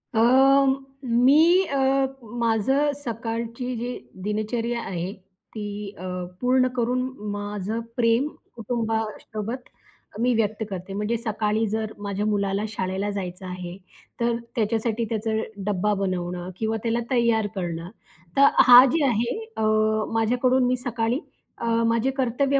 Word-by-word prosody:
अ, - - +3 0.9
मी 295 +10 +5
अ, 270 -2 +2 0.3
माझं 235 +6 +2
सकाळची 235 +1 -4
जी 245 +2 -4 0.3
दिनचर्या 225 +3 -1
आहे, 180 -2 -4
ती 200 +2 -8
अ, 180 - -9 0.4
पूर्ण 255 +1 +3
करून 245 +1 +1 0.3
माझं 205 +1 -3 0.2
प्रेम 235 +3 +3 0.3
कुटुंबासोबत 225 0 -3 0.5
मी 245 +1 +3
व्यक्त 220 0 0
करते. 190 0 -6
म्हणजे 210 +3 -1
सकाळी 220 -1 0
जर 220 0 -2
माझ्या 200 +1 -2
मुलाला 200 -1 0
शाळेला 195 -1 -2
जायचं 185 -2 -5
आहे, 180 -1 -6 0.4
तर 235 0 +1 0.2
त्याच्यासाठी 225 0 0
त्याचा 220 0 -1 0.3
डब्बा 210 +1 +1
बनवणं 180 -2 -2
किंवा 220 +1 -1
त्याला 230 0 +1
तयार 235 -4 +3
करणं, 170 -2 -4 0.5
तर 280 0 +8 0.2
हा 245 0 +11
जे 325 -2 +2
आहे 235 -1 +1 0.2
अ, - - 0 0.5
माझ्याकडून 250 +3 +2
मी 250 - +2
सकाळी 240 0 -1 0.4
अ, - - -2 0.2
माझे 230 +3 +2
कर्तव्य 270 +2 +2
225 Hz, 120 wpm, -24 LUFS, 205-245 Hz, 0.9 s, हा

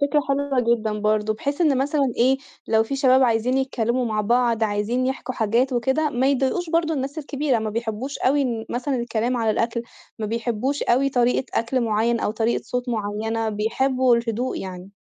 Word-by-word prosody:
فكرة 290 +1 +3
حلوة 275 -1 +1
جدًا 225 -3 0
برضه 215 0 +1
بحيث 280 +7 -3
إن 295 -6 +3
مثلًا 275 -1 +1
إيه، 260 +3 +4 0.3
لو 220 0 +4
في 275 +5 -3
شباب 260 -1 +4
عايزين 245 +1 +2
يتكلّموا 250 -2 0
مع 215 -2 -1
بعض، 235 +1 +1
عايزين 215 +5 0
يِحكوا 260 -1 -3
حاجات 235 +5 +1
وكده، 265 +5 +1
ما 255 0 +1
يضايقوش 280 +6 0
برضه 330 -1 +1
الناس 275 +2 -3
الكبيرة، 285 -3 -1
ما 220 -1 -3
بيحبوش 230 +4 -4
أوي 280 +2 +2
إن 235 -4 -2
مثلًا 260 +3 -2
الكلام 235 +1 -1
على 225 -2 +1
الأكل، 230 +2 -1 0.4
ما 215 - -2
بيحبوش 235 +5 -2
أوي 265 +3 +2
طريقة 250 -1 +1
أكل 240 +3 0
معيّن 230 +1 +1
أو - - 0
طريقة 225 +2 0
صوت 250 0 -3
معيّنة، 220 0 -2
بيحبوا 250 +4 +2
الهدوء 235 +2 -2
يعني. 185 0 -7
240 Hz, 180 wpm, -23 LUFS, 225-265 Hz, 0.4 s, إيه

